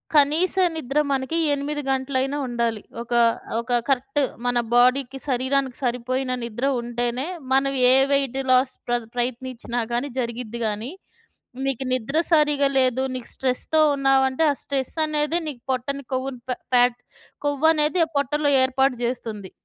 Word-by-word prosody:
కనీస 300 +5 +4 0.2
నిద్ర 290 -1 -1
మనకి 270 +5 -1 0.2
8 295 +1 -2
గంటలైనా 265 +1 0
ఉండాలి. 235 -3 -1 0.2
ఒకా 235 0 +1 0.4
ఒక 240 +1 +1
కరెక్ట్ 270 +2 +1 0.2
మన 245 0 +1 0.2
బోడీకి, 255 +2 +3
శరీరానికి 260 0 0
సరిపోయిన 255 +2 -1
నిద్ర 235 +3 -3 0.2
ఉంటేనే, 240 +2 -2 0.3
మనం 275 +1 +2 0.2
ఏ - - +6 0.2
వెయిట్‌లాస్ 265 -1 +2
ప్రద్ 240 -2 -1
ప్రయత్నించినా 245 -1 -3
కానీ 245 +4 -1
జరిగిద్ది 235 -1 -4
గానీ, 215 +6 -4 0.8
నీకు 270 -1 -1
నిద్ర 255 +4 -1 0.2
సరిగా 295 -3 +4
లేదు. 260 0 +2
నీకు 250 -2 -7
స్ట్రెస్‌తో 265 +4 0
ఉన్నావంటే 270 +2 +2
ఆ - - +3
స్ట్రెస్ 270 -2 -3
అనేదే 305 +2 0
నీకు 250 -5 -8
పొట్టని 275 +2 -3
కొవ్వుని 260 -1 -3
పె 250 - -1 0.2
ఫ్యాట్ 245 0 +4 0.5
కొవ్వనేది 305 +3 +2
ఆ - - -20
పొట్టలో 290 +1 +1
ఏర్పాటు 265 0 +2
చేస్తుంది. 225 -6 -4
260 Hz, 130 wpm, -23 LUFS, 245-280 Hz, 0.8 s, ఏ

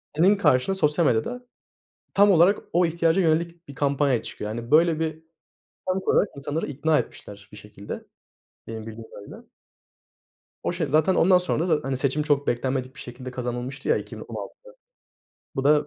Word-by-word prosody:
senin 185 +7 +5
karşına 190 0 +2
sosyal 160 -2 +2
medyada 245 - 0 0.7
tam 205 0 +6
olarak 180 +3 +5
o 175 +1 +4
ihtiyaca 165 +2 +2
yönelik 170 0 0
bir 140 - -9
kampanya 140 -3 +1
çıkıyor. 105 - -6
Yani, 115 +3 -6
böyle, 160 +1 +4
bir 160 0 -3 0.7
sonuç 190 +1 0
olarak 205 - +3
insanları 145 +3 -3
ikna 150 +2 +1
etmişler 100 0 -8
bir 105 - -12
şekilde. 105 -1 -9 0.6
Benim 110 -1 -6
bildiğim 110 0 -9
kadarıyla 100 - -12 1.2
o, - - 0
şey, 170 -4 -2
zaten 155 +6 +3
ondan 185 +1 +5
sonra 180 -1 -1
da, 155 -2 +3
hani, 135 -1 -2
seçim 140 +2 0
çok 145 -2 +1
beklenmedik 130 +2 -1
bir - - -11
şekilde 125 +1 -8
kazanılmıştı 125 +2 -4
ya - - +4
2016'da. - - -8 0.9
Bu 135 - -1
da 150 0 +4
150 Hz, 160 wpm, -25 LUFS, 125-170 Hz, 1.2 s, tam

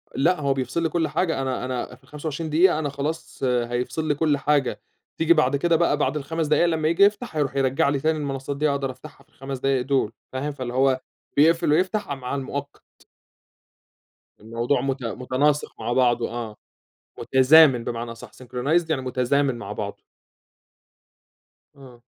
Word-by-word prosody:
لأ، 170 +5 +2
هو 140 -1 +2
بيفصل 135 +5 -2
لي 165 - +1
كل 165 0 0
حاجة، 165 -7 -1
أنا 130 -1 -2
أنا 125 0 -4
في 130 - -27
ال25 150 +3 -5
دقيقة 160 +1 +4
أنا 145 -2 -2
خلاص، 145 +4 -5
هيفصل 125 +4 -1
لي 145 - +1
كل 150 -1 +1
حاجة، 140 -2 0 0.4
تيجي 165 +1 +4
بعد 145 -4 +2
كده 165 +4 +2
بقى 165 -3 +2
بعد 150 - 0
ال5 160 +2 -2
دقايق 155 +3 +3
لمّا 160 -2 0
ييجي 170 +5 +4
يفتح، 210 -1 +1
هيروح 145 -3 -1
يرجّع 135 +3 +2
لي 140 -1 0
تاني 155 +3 +1
المنصات 140 -1 -4
دي، 150 +1 +2
أقدر 140 -2 -1
أفتحها 145 +3 -14
في - - -37
ال5 135 0 -7
دقايق 135 -1 +1
دول، 135 -6 +1 0.2
فاهم، 135 +3 -2
فاللي 130 -4 -6
هو 130 0 +2 0.4
بيقفل 160 +1 +4
ويفتح 185 +7 +1
ع 140 - -3
مع 130 0 -5
المؤقت. 140 +1 -7 1.3
الموضوع 115 +4 -1
مت 135 -1 -2
متناسق 130 +5 0
مع 115 +2 -2
بعضُه، 120 -2 +2
آه، 115 -3 -5 0.6
متزامن 130 -2 +5
بمعنى 115 0 -4
أصح، 115 - -12
synchronized 130 +7 -1
يعني 140 -4 0
متزامن 130 +2 +1
مع - - -6
بعضُه. - - -5 1.8
آه. 130 -4 -15
140 Hz, 170 wpm, -24 LUFS, 130-155 Hz, 1.8 s, متزامن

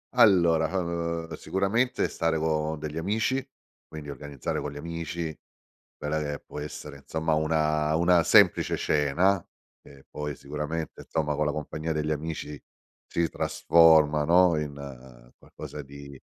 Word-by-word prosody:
Allora, 85 -6 +5
uhm, 85 -1 -3
sicuramente 100 +6 0
stare 80 -1 -1
con 80 0 -1
degli 75 +1 -6
amici, 110 +8 0 0.4
quindi 75 -2 -8
organizzare 70 -2 -5
con 75 - -4
gli 70 - -9
amici 85 0 -5 0.6
quella 75 +1 -2
che 75 -1 -3
può - - -8
essere, 75 -1 -7
insomma, 80 +3 -2
una 75 0 +1
una 85 +1 +4
semplice - - +4
cena. 85 +6 +2 0.4
E 70 -1 -17
poi 75 -2 -5
sicuramente, 75 +3 -5
insomma, 75 -2 -2
con 75 - 0
la 75 - +1
compagnia 75 +2 -4
degli 75 0 -1
amici 75 -1 -4 0.5
si 85 -1 0
trasforma, 80 -3 +4
no, 90 +1 +5
in 65 -4 -9
qualcosa 75 - -9
di 70 0 -11
75 Hz, 130 wpm, -27 LUFS, 75-85 Hz, 0.6 s, Allora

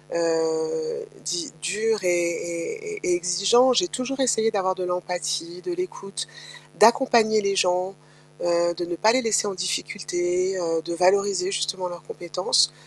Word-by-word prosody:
heu, 165 - -1 0.2
dit 170 +2 -3
dur 210 +4 0
et - - +1
et 175 - -2
et - - -7
et 180 - +2
exigeant, 195 +9 +4
j'ai 355 +9 +3
toujours 270 -2 -4
essayé 225 -3 +3
d'avoir 190 -3 +1
de 185 - -4
l'empathie, 180 - -3
de 365 -1 -5
l'écoute, 345 - -5 0.5
d'accompagner 225 -1 +5
les 200 -1 0
gens, 180 0 +1 0.5
heu, 170 0 +2
de 175 0 -4
ne 175 0 -4
pas 215 +7 +4
les 260 +2 +2
laisser 225 -3 +1
en 200 - -2
difficulté, 180 +1 -1
heu, 165 -2 0
de 170 +1 -5
valoriser 190 +1 +2
justement 180 +1 -1
leurs 175 -1 -9
compétences, 160 -3 +1
185 Hz, 155 wpm, -24 LUFS, 175-225 Hz, 0.5 s, d'accompagner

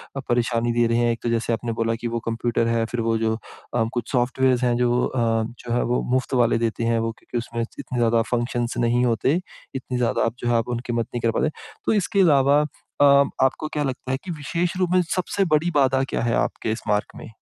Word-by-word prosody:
अ, - - -2
परेशानी 120 -1 +1
दे 120 0 +3
रहे 115 0 +1
हैं। 120 0 +2
एक 115 - -3
तो 120 - 0
जैसे 115 0 0
आपने 115 +1 -2
बोला 115 0 +1
कि 120 - -2
वो 115 0 -2
कंप्यूटर 115 0 0
है, 115 -1 +1
फिर 115 +1 -3
वो 115 0 +1
जो 110 0 0 0.4
अ, 120 - +2
कुछ 120 - -3
सॉफ्टवेयर्स 130 0 +2
हैं 120 -1 +2
जो 125 0 +2
अ, - - -4 0.4
जो 120 -1 -4
है 120 - +2
वो 125 +1 0
मुफ़्त 130 +1 0
वाले 115 - +2
देते 115 0 -1
हैं 115 0 +2
वो 115 0 -1
क्योंकि - - -6
उसमें 115 0 -3
इतने 120 +2 -6
ज़्यादा 115 -1 +3
फंक्शन्स 120 0 -1
नहीं 120 +1 +2
होते, 125 +7 +1 0.4
इतनी 130 -1 -3
ज़्यादा 120 -2 +1
आप 115 - -1
जो 120 - -3
है, 120 - +2
आप 115 -1 +1
उनकी 120 0 -3
मत 115 -1 0
नहीं 120 - -2
कर 115 - +2
पाते। 155 - +2 0.4
तो - - +2
इसके 200 -1 +1
अलावा 145 -4 +5 0.4
अ, - - +8 0.4
आपको 135 +3 +1
क्या 150 - 0
लगता 130 -1 -4
है 130 - +1
कि 185 - -5
विशेष 170 +3 -2
रूप 185 -2 +1
में 185 - +5
सबसे 190 +1 0
बड़ी 165 +3 +1
बाधा 135 -2 +3
क्या - - -1
है, 120 -1 +1
आपके 110 - -1
इस 110 - -3
मार्ग 105 0 -1
में? - - -10
120 Hz, 240 wpm, -23 LUFS, 115-130 Hz, 0.4 s, अ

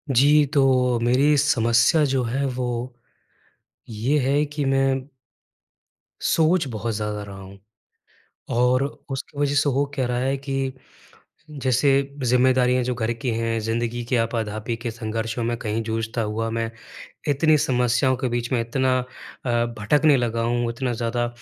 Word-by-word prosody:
जी, 145 +3 +5
तो 130 -4 +2
मेरी 135 +5 +3
समस्या 120 +2 +3
जो 130 -2 +1
है 130 +4 -1
वो 125 0 -3 1.0
ये 115 +7 0
है 145 +2 +2
कि 145 0 -3
मैं 135 0 +2 1.3
सोच 165 +1 +2
बहुत 115 -1 -3
ज़्यादा 105 -1 -3
रहा 100 -1 -10
हूँ। 95 +1 -12 0.9
और 125 +2 +3 0.3
उसकी 135 +2 -6
वजह 145 0 +1
से 145 0 +3
हो 140 +2 +1
क्या 130 -3 0
रहा 120 0 -1
है 135 +2 0
कि 135 -1 -3 0.8
जैसे 135 -1 +1 0.3
ज़िम्मेदारियाँ 125 0 +3
जो 125 0 -2
घर 115 0 -1
की 115 +2 -4
हैं, 115 0 -1
ज़िंदगी 115 +2 -2
की 125 - -1
आपा-धापी 115 -1 -2
के 115 0 -4
संघर्षों 115 0 -3
में 120 +1 -1
कहीं 110 0 -2
जूझता 115 +1 -2
हुआ 110 +1 -2
मैं, 115 0 -2 0.6
इतनी 155 +2 +4
समस्याओं 125 -1 +2
के 130 0 -2
बीच 120 0 -2
में 120 - +2
इतना 130 +2 +1
अ, 125 - -4 0.7
भटकने 145 +7 +4
लगा 115 -2 -1
हूँ, 120 0 0
इतना 125 +1 -2
ज़्यादा 120 +1 -1
125 Hz, 150 wpm, -23 LUFS, 115-135 Hz, 1.3 s, जी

